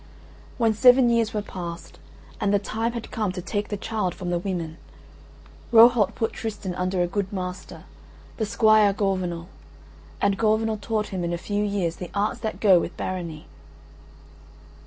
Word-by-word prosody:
When 230 -3 +2
seven 250 +2 +6
years 230 -2 +2
were 210 -1 -2
passed 175 -3 -8 0.4
and 200 - +1
the 205 - +4
time 225 +3 -2
had 235 -2 -6
come 215 -4 -1
to 185 - -5
take 205 +1 -2
the 205 - -4
child 210 -4 -2
from 180 -2 -4
the 175 - 0
women, 170 -4 -4 0.9
Rohalt 230 -3 +6
put 225 - -1
Tristan 210 -4 -5
under 180 0 0
a - - 0
good 195 +1 -3
master, 180 -1 -6 0.5
the 220 - -1
Squire 215 -2 +4
Gorvenal, 185 -4 -2 0.7
and 200 -1 +1
Gorvenal 220 0 +1
taught 215 -1 -2
him 185 -3 -3
in 170 0 -2
a - - -1
few 205 +4 -2
years 195 -5 -1
the 180 - -7
arts 210 +4 0
that 220 -1 -4
go 190 -5 +6
with 170 - -5
barony. 170 -4 -5
200 Hz, 165 wpm, -24 LUFS, 180-220 Hz, 0.9 s, seven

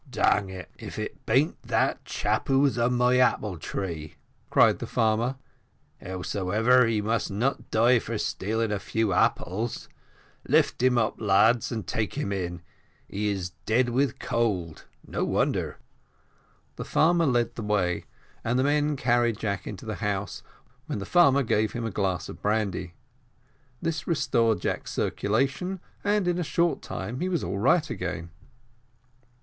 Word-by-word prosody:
"Dang 100 -5 +2
it, 95 -1 -9
if - - -8
it - - -6
bean't - - +2
that - - 0
chap - - -1
who 135 0 +3
was 140 -2 +3
on 120 +1 +2
my 125 +1 +3
apple 105 -7 +1
tree," 80 -3 -5 0.3
cried - - +4
the - - -5
farmer 115 +3 +1 0.7
"howsomever, 100 +7 +2
he 110 -2 +1
must 115 +1 0
not 120 +8 -1
die 120 +2 +4
for 115 0 -4
stealing 110 +3 -1
a 105 - -1
few 110 +2 -1
apples; 110 +7 0 0.6
lift - - +2
him 130 -1 +4
up, 115 -1 0
lads, 110 +4 +3
and 110 -5 -3
take 110 +2 -2
him 145 -8 -2
in 90 -3 -3 0.4
he 105 +1 -2
is 95 -3 -3 0.2
dead 120 +3 +3
with 130 +1 +1
cold 95 -9 -2 0.2
no - - -2
wonder." - - 0 1.0
The - - -4
farmer 170 0 +3
led 120 -3 +1
the - - -6
way, 100 -5 0 0.4
and 120 +2 0
the 130 - +3
men 145 +1 +2
carried 120 -3 +2
Jack 100 -4 -3
into - - -7
the - - -4
house, - - -2 0.5
when - - -3
the 100 - -5
farmer 140 - +5
gave 110 -2 +1
him 120 -1 -3
a 115 - -2
glass 95 -3 -1
of - - -10
brandy; 100 -5 -1 0.9
this 160 -1 -2
restored 115 - +2
Jack's - - -3
circulation, 135 - -1 0.2
and 205 -2 +1
in 175 0 +1
a - - 0
short 170 +2 +1
time 120 +4 -5
he 185 - -1
was 175 -3 -1
all 100 - -3
right 155 - +3
again. 90 - -5
115 Hz, 155 wpm, -26 LUFS, 100-130 Hz, 1.0 s, farmer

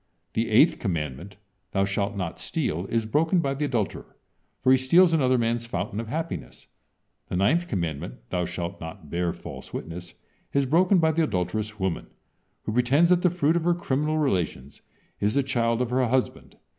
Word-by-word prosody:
The 115 +1 0
eighth 120 +9 +5
commandment: 85 - -4 0.4
"Thou 95 0 +2
shalt 100 +1 -1
not 90 -4 -4
steal," 85 +5 -2
is 115 -1 0
broken 160 +10 +2
by 140 -5 +1
the 145 +2 -1
adulterer, 120 -7 -3 0.5
for 130 - +5
he 130 - +7
steals 165 +7 +5
another 130 -5 +3
man's 115 0 0
fountain 100 0 -3
of 115 - -4
happiness. 160 +7 -5 0.6
The - - -4
ninth 150 - +2
commandment" 80 - -3 0.2
"Thou 90 -1 0
shalt 85 +2 -5
not 80 -1 -9
bear 85 0 0
false - - -9
witness," 85 +2 -7 0.4
is 140 -1 +3
broken 180 +8 +4
by 160 -2 +4
the 160 +1 +1
adulterous 105 - -2
woman, 95 -3 -2 0.6
who 110 - -3
pretends 135 +9 +4
that 180 -1 +4
the 180 - +4
fruit 165 -2 +1
of 170 - +1
her 175 0 +3
criminal 150 -1 0
relations 90 - -1 0.4
is 105 +2 +1
the 140 - +3
child 115 -2 +1
of 125 - -4
her 130 0 +2
husband. 130 +2 -1
115 Hz, 180 wpm, -26 LUFS, 95-150 Hz, 0.6 s, he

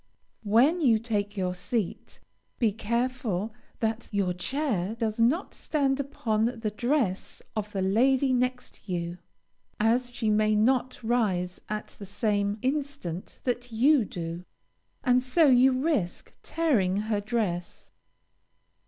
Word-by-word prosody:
When 260 - +4
you 245 -8 +4
take 210 -2 -2
your 180 -1 0
seat, 195 +2 -3 0.4
be 225 -4 +2
careful 225 -2 -2 0.3
that 225 +1 -1
your 195 -4 +1
chair 220 - -2
does 225 -1 -2
not 260 +11 +2
stand 275 -3 0
upon 225 -6 0 0.2
the 215 -2 -1
dress 235 -3 -1
of 210 -1 -3
the 195 -2 -1
lady 255 +7 +3
next 250 -3 -2
you, 175 0 -3 0.6
as 240 +3 +2
she 225 -3 -1
may 215 0 +3
not 250 +3 +1
rise 195 -7 0
at 215 0 -4
the 200 - -8
same 205 0 0
instant 270 - -3
that 245 -1 -2
you 260 +4 +4
do, 170 -2 -6 0.6
and 250 -1 +4
so 260 +6 +3
you 255 +1 +6
risk 255 - -1
tearing 225 - +1
her 210 0 -1
dress. 205 -6 -3
225 Hz, 125 wpm, -27 LUFS, 200-255 Hz, 0.6 s, you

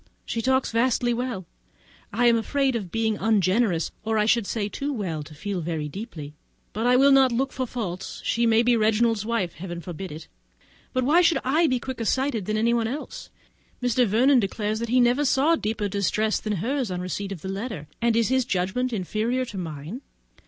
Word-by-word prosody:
She 230 - -2
talks 260 +2 +1
vastly 240 +1 +2
well; 235 -6 -3 0.7
I 240 +4 +1
am 235 -1 +6
afraid 265 +3 0
of 195 -7 -4
being 220 -1 0
ungenerous, 200 -3 +2
or 220 0 0
I 210 - +3
should 225 -2 +2
say, 210 -3 -1
too 280 +7 -4
well 185 - -3
to 150 +1 -11
feel 200 +4 -3
so - - -5
very 160 -3 -2
deeply; 155 - -8 0.4
but 225 +4 -1
I 250 - +5
will 275 +2 +6
not 270 -2 +6
look 265 +3 -1
for 255 -1 -2
her - - -20
faults; 190 -7 -5
she 235 0 +2
may 225 +1 +4
be 240 0 +4
Reginald's 220 -1 +2
wife! 215 -8 -1
Heaven 175 +1 -6
forbid 175 +2 -7
it! 155 +2 -9 0.6
but 255 - 0
why 310 +7 +5
should 335 -4 +4
I 315 +6 +3
be 255 -3 +1
quicker 250 -1 -5
sighted 260 -5 0
than 215 0 0
anyone 230 +1 +2
else? 280 +6 -6 0.5
Mr. 245 -1 +2
Vernon 250 +6 +4
declares 210 +1 -2
that 235 0 -3
he 250 +2 +3
never 245 +4 +3
saw 290 +4 +3
deeper 215 -6 -2
distress 205 +2 0
than 215 - -3
hers, 245 - -1
on 180 - -3
the 180 - -4
receipt 195 +2 -4
of 175 -5 -7
the - - -4
letter; 195 -6 -5
and 235 -1 +2
is 230 -1 +2
his 260 0 +2
judgment 225 +5 -1
inferior 225 +5 -1
to 210 - -8
mine? 160 - -6
225 Hz, 210 wpm, -25 LUFS, 195-250 Hz, 0.7 s, am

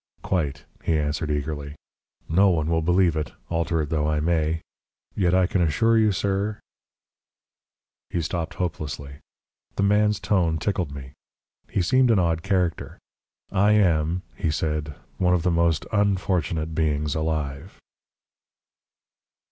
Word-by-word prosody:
"Quite," 75 -7 -1 0.2
he 80 - +1
answered 75 +1 -1
eagerly. 75 0 -3 0.5
"No 95 +5 +4
one 80 -2 +1
will 80 0 +2
believe 90 0 +3
it, 75 -1 -3 0.2
alter 85 -1 0
it 75 - -6
though 75 -2 +1
I 75 -1 +1
may. 80 0 0 0.5
Yet 90 -3 +2
I 95 -1 +4
can 90 +1 0
assure 115 +8 +3
you, 110 -2 +4
sir 100 +2 -1 0.8
" - - -69
He 85 - -2
stopped 80 +1 -3
hopelessly. 75 -5 -4 0.6
The - - 0
man's 105 +1 +3
tone 85 -7 +1
tickled 90 -2 -1
me. 70 -1 -9 0.6
He 95 - 0
seemed 130 +5 +3
an 115 - +4
odd 85 -3 +1
character. 90 -3 -1 0.5
"I 105 +1 +4
am," 90 -3 +2
he 80 - -1
said, 75 -1 -2 0.2
"one 90 -1 +3
of 85 - -1
the 90 - +2
most 85 -2 +1
unfortunate 90 -6 0
beings 75 -2 0
alive." 80 +1 -3
85 Hz, 140 wpm, -24 LUFS, 75-95 Hz, 0.8 s, No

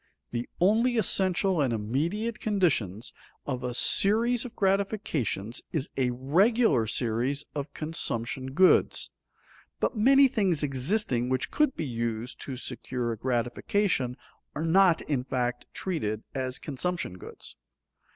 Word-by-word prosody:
The 120 0 -3
only 230 +6 +3
essential 190 -4 +2
and 135 -4 +1
immediate 160 - -2
conditions 130 - 0 0.3
of 125 -3 -3
a 125 -1 -3
series 230 - +3
of 245 -1 -9
gratifications 190 - -1
is 155 -4 -2
a 130 -2 +1
regular 145 - +2
series 120 +5 -1
of 145 0 -4
consumption 130 -4 -4
goods. 185 +4 +4 0.7
But - - 0
many 270 +5 +6
things 195 - +1
existing 135 - 0
which 130 -1 -1
could 300 -3 +2
be 160 - -3
used 115 -1 -4
to 130 -2 -5
secure 125 -1 -4
a - - -2
gratification 125 - 0 0.4
are 155 - -2
not 175 0 +4
in 135 -4 -1
fact 125 -2 -2
treated 110 - -3
as 130 -1 -2
consumption 150 - -4
goods. - - -11
145 Hz, 125 wpm, -28 LUFS, 125-195 Hz, 0.7 s, many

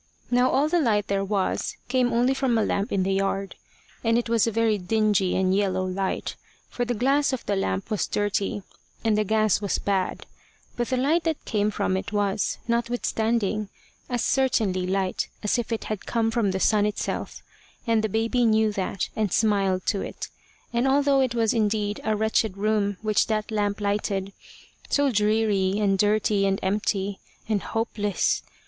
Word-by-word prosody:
Now 250 +1 +4
all 280 +3 +2
the 350 +2 +2
light 210 -6 +2
there 195 0 +1
was 195 -1 -1
came 250 -1 +1
only 245 +3 +2
from 265 -3 +1
a 220 - +2
lamp 200 +1 -1
in 195 -2 +1
the 195 +1 0
yard, 195 0 -1 0.5
and 230 0 +3
it 240 -1 -1
was 230 -1 +3
a - - +1
very 225 -1 +1
dingy 205 -1 +1
and 190 0 +2
yellow 190 -2 +1
light, 190 +1 -2 0.4
for 245 - -2
the 245 0 -1
glass 275 +4 +2
of 260 - -4
the 205 - 0
lamp 95 - -2
was 210 - 0
dirty, 205 -1 -1 0.4
and 220 -2 +2
the 215 - +2
gas 215 -1 +2
was 200 - 0
bad; 195 -2 -1 0.5
but 240 -1 -1
the 260 - 0
light 305 +6 +2
that 320 -2 -2
came 210 -1 +1
from 190 -2 -1
it 190 - -3
was, 205 -1 0
notwithstanding, 230 -3 0 0.4
as 245 -2 -1
certainly 215 -9 +1
light 190 0 -1
as 210 +4 +1
if 235 - -4
it 225 - -2
had 215 -3 -5
come 225 -1 +1
from 225 -3 +1
the 190 0 -1
sun 210 +1 +3
itself, 210 - -4 0.4
and 225 -2 +2
the 220 - 0
baby 225 +4 +1
knew 220 -1 +3
that, 195 -2 -2
and 215 -4 0
smiled 195 -4 +1
to 200 - 0
it; - - -6 0.4
and 240 +3 +2
although 280 0 +3
it 255 -2 0
was 225 -2 +2
indeed 210 -2 0
a 215 - +1
wretched 220 -2 0
room 205 -1 0
which 215 -1 +2
that 215 0 -2
lamp 205 -1 0
lighted 200 -1 -1 0.6
so 285 -1 +2
dreary, 210 -3 +2
and 195 -2 +1
dirty, 205 -1 +2
and 195 0 0
empty, 200 0 -1 0.3
and 210 -3 0
hopeless! 210 -4 -1
215 Hz, 180 wpm, -25 LUFS, 195-230 Hz, 0.6 s, Now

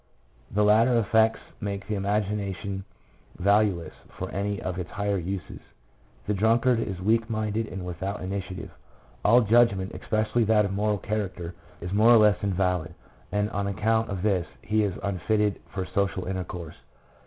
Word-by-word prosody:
The 105 - +1
later 115 +4 +5
effects 110 0 +3 0.2
make 100 -2 -4
the 110 - -2
imagination 100 -1 -2 0.5
value 100 -1 +3
less 80 - -10 0.3
for - - -4
any 100 +1 -2
of 90 -1 -4
its 90 - -5
higher 100 -1 -1
uses. 90 0 -5 0.7
The 105 - 0
drunkard 115 +4 +3
is 95 -5 -3
weak 115 +4 +1
minded 110 0 -1
and 90 0 -6
without 95 +3 -4
initiative. 95 -1 -5 0.5
All 120 +4 +6
judgment, 105 -4 +3
especially 110 +2 0
that 105 -1 +4
of 100 - -3
a - - -3
moral 105 +1 +1
character, 95 -4 -3 0.3
is 90 - -5
more 110 +3 +5
or 120 - +9
less 105 -1 +4
invalid, 90 -4 0 0.4
and 105 +1 0
on 100 -2 -1
account 110 +3 +1
of 95 -2 -4
this 95 -5 +1 0.2
he 110 0 +1
is 100 -3 -1
unfitted 100 +2 0
for 95 -2 -3
social 95 0 -1
intercourse. 90 -3 -5
100 Hz, 160 wpm, -26 LUFS, 95-110 Hz, 0.7 s, or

